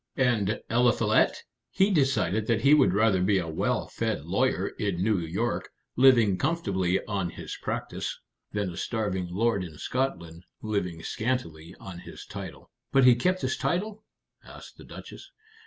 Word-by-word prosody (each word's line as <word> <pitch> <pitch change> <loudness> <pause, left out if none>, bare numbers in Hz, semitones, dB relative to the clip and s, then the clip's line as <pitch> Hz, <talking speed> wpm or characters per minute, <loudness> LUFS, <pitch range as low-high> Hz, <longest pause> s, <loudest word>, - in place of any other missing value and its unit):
And 110 -6 +1
Eliphalet, 120 0 +2 0.3
he 195 +2 +2
decided 135 - +1
that 115 -2 +1
he 140 +4 +5
would 145 -8 +5
rather 105 -3 +3
be 100 +2 +3
a 90 -3 -1
well 80 - -1
fed - - -3
lawyer - - +1
in 95 -4 -1
New 105 -2 +2
York, 90 +8 -2 0.3
living 120 -7 +5
comfortably 100 - 0
on 100 -5 -2
his - - -7
practice, - - -4 0.3
than 100 -3 -2
a 85 - -10
starving 100 -6 -2
lord 100 +1 +1
in 80 -4 -9
Scotland, 85 - -3 0.2
living 90 -6 -2
scantily 85 -11 -3
on 90 -3 -9
his - - -11
title." 95 -9 -9 0.2
"But 135 - +4
he 125 - +8
kept 185 +10 0
his - - 0
title?" 210 +4 -2 0.4
asked - - -13
the - - -13
Duchess. - - -11
105 Hz, 155 wpm, -27 LUFS, 90-125 Hz, 0.4 s, he